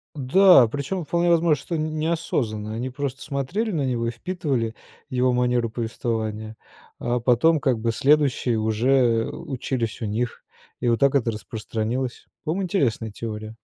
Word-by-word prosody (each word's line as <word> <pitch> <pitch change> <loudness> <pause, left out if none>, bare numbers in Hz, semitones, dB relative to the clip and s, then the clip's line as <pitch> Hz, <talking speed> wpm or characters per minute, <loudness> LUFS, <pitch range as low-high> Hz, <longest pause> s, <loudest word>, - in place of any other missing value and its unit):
Да, 145 - +6
причем 145 - -3
вполне 170 +2 +1
возможно, 165 -2 +4
что 170 - -3
неосознанно, 155 -9 -2
они 125 +3 -3
просто 135 0 -4
смотрели 160 - -2
на 145 -6 0
него 120 -2 -1
и - - -1
впитывали 130 -6 -2 0.3
его 125 0 +2
манеру 125 -1 +1
повествования. 110 -2 -3 0.4
А 120 0 0
потом, 135 +6 +3
как 130 -6 +1
бы, 115 +1 0
следующие 135 -2 +2
уже, 110 +4 0
э, 120 -4 +3
учились 125 -4 -4
у - - -1
них, 115 +3 -3 0.4
и 120 - +1
вот 115 - +2
так 140 0 +3
это 120 -4 +2
распространилось. 115 +3 -4 0.2
По-моему, 170 +5 -1
интересная 120 - 0
теория. 110 0 -6
125 Hz, 150 wpm, -24 LUFS, 115-150 Hz, 0.4 s, Да